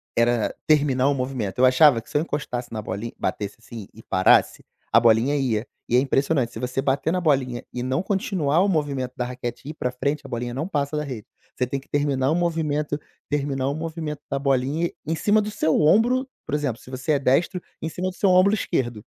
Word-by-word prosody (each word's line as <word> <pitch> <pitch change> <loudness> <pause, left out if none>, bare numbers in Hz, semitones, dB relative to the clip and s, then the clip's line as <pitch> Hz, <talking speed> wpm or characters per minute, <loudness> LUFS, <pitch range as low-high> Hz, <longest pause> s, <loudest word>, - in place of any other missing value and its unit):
era 115 -1 +2
terminar 140 -4 +3
o - - +3
movimento. 125 -6 -3
Eu 130 - +6
achava 130 -1 +6
que - - -20
se - - 0
eu 150 - +2
encostasse 125 -7 -4
na 110 -1 -4
bolin 100 +5 -5
batesse, 105 +1 -3
assim, 115 -3 -10
e 110 - -13
parasse, 95 - +3 0.3
a 115 - +6
bolinha 115 +5 +4
ia. 120 -4 0 0.2
E 120 - +2
é - - +7
impressionante, 135 -2 +1
se - - -6
você 125 +1 -2
bater 140 +4 0
na 185 - +1
bolinha 130 -6 +1
e 125 - -4
não 130 +5 0
continuar 185 -5 0
o 200 - +3
movimento 140 -8 -1
da 125 - -2
raquete 125 +1 -6
e - - -4
ir - - -5
para 125 -5 -2
frente, 140 +4 -2
a - - -7
bolinha 120 -1 -3
não 145 +7 -3
passa 145 -4 -1
da 150 - -1
rede. 125 -8 -7 0.3
Você 125 - 0
tem 140 +2 -2
que 135 - -20
terminar 145 -1 +1
o - - +2
movimento, 155 -4 -1 0.3
terminar 140 -2 -1
o 140 - -2
movimento 155 -2 -5
da 140 - -1
bolinha 140 +5 +1 0.2
em 160 - -1
cima 210 +5 +3
do 210 0 -4
seu 160 -6 +1
ombro. 240 - +3 0.2
Por 150 - -2
exemplo, 135 -5 -2
se - - -14
você 130 +4 -1
é 140 - +2
destro, 170 +7 +1 0.2
em 160 - -2
cima 185 +3 -3
do 185 - -10
seu 200 - +2
ombro 185 +3 +5
esquerdo 120 - -1
140 Hz, 225 wpm, -24 LUFS, 125-155 Hz, 0.3 s, é